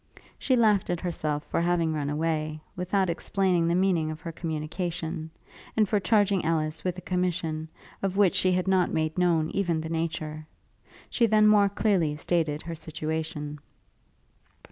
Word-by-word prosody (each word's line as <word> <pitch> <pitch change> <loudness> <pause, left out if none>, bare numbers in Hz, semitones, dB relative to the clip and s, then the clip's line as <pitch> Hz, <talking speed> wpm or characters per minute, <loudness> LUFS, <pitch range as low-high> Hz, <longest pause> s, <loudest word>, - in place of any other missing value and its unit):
She 260 - +2
laughed 215 -5 +3
at 175 -1 0
herself 155 -4 -2
for - - -1
having 170 -2 +1
run 145 -2 -2
away, 155 0 -1 0.2
without 185 +2 0
explaining 175 0 +1
the 170 - +2
meaning 180 -4 +2
of 155 0 -5
her 170 -2 -5
communication; 160 0 -4 0.5
and 215 -1 +4
for 210 +1 +2
charging 200 -2 +2
Ellis 155 -1 -1
with 180 -1 -2
a - - -6
commission, 175 -4 -2 0.3
of 195 0 -1
which 200 -3 +5
she 185 - +2
had 180 +1 0
not 190 -2 +3
made 155 0 -1
known 170 -3 +2
even 175 -5 0
the 160 0 -5
nature. 155 -2 -3 0.6
She 235 - +3
then 215 0 +4
more 205 -1 +6
clearly 190 -7 +1
stated 155 -1 -1
her 170 - -5
situation. 155 -1 -4
170 Hz, 160 wpm, -27 LUFS, 155-185 Hz, 0.6 s, more